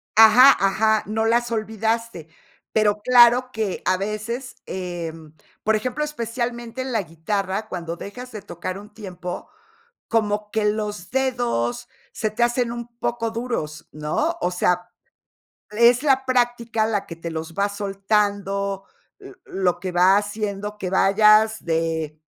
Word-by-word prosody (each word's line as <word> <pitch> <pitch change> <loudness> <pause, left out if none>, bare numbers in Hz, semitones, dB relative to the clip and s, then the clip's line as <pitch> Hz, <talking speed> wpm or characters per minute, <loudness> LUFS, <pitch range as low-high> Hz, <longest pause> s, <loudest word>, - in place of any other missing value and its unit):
Ajá, 225 +5 +8
ajá, 215 +2 +2
no 220 +1 -1
las 235 +1 +2
olvidaste. 220 -4 -2 0.4
Pero 210 -1 +2
claro 250 +1 +6
que 215 -5 -3
a 185 0 +2
veces, 215 +6 -4
em, 165 -4 -6 0.3
por 220 0 +3
ejemplo, 255 +7 -2
especialmente 240 -3 -4
en 260 0 -4
la 220 -3 +1
guitarra, 195 +5 -3
cuando 170 -2 -5
dejas 250 +5 -8
de 215 -2 -7
tocar 185 0 -6
un 210 +1 -12
tiempo, 180 -4 -7 0.6
como 210 -2 0
que 220 -2 0
los 210 -3 -2
dedos 245 - -1 0.2
se 215 -1 -2
te 225 +3 -3
hacen 240 0 +1
un 235 0 -6
poco 230 -1 -2
duros, 225 -11 -4
¿no? 155 - -1
O 180 - 0
sea, 180 0 0 0.8
es 235 +4 +4
la 265 -2 +3
práctica 240 -3 +1
la 205 -3 -1
que 165 - -7
te 165 0 -6
los 160 0 -5
va 200 +1 +1
soltando, 200 -1 -1 0.3
l 395 -1 -12
lo 185 -2 0
que 185 0 -4
va 185 +3 +5
haciendo 205 0 -3
que 185 -3 -4
vayas 215 +3 +4
de 160 -2 -2
210 Hz, 140 wpm, -23 LUFS, 190-235 Hz, 0.8 s, Ajá